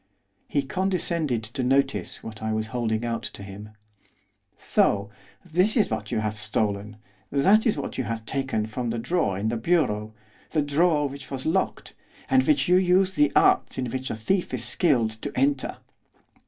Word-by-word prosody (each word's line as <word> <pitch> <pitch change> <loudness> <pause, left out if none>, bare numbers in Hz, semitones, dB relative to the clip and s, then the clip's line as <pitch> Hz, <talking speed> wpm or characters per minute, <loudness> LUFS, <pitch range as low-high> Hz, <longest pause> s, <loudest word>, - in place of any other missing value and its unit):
He 145 - 0
condescended 170 - -1
to 120 +5 -5
notice 125 -7 0
what 110 -1 -8
I 110 0 -1
was 110 0 -2
holding 115 -2 -1
out 115 -1 -2
to 100 - -7
him. 100 +2 -9 0.9
'So! 100 0 +1 0.3
that 180 +7 +2
is 210 - +2
what 110 -1 -3
you 110 - 0
have 105 0 -2
stolen! 105 0 -2 0.3
That 195 - +4
is 215 - +1
what 140 - -4
you 130 - -1
have 115 -1 -4
taken 135 -4 -1
from 120 +2 -4
the 115 - -2
drawer 115 - 0
in 105 +3 -1
the 120 - -1
bureau 110 -7 0 0.4
the 155 - +2
drawer 150 +1 +2
which 140 0 -9
was 130 -1 -5
locked 190 +4 -1 0.4
and 265 0 +6
which 300 -2 +3
you 180 +1 +5
used 185 +1 +3
the 295 +1 +3
arts 380 0 +4
in 125 -3 -2
which 130 +2 -3
a - - -2
thief 175 - -1
is - - -1
skilled 125 -11 +2
to - - -4
enter. 135 +1 +1
130 Hz, 180 wpm, -25 LUFS, 110-175 Hz, 0.9 s, and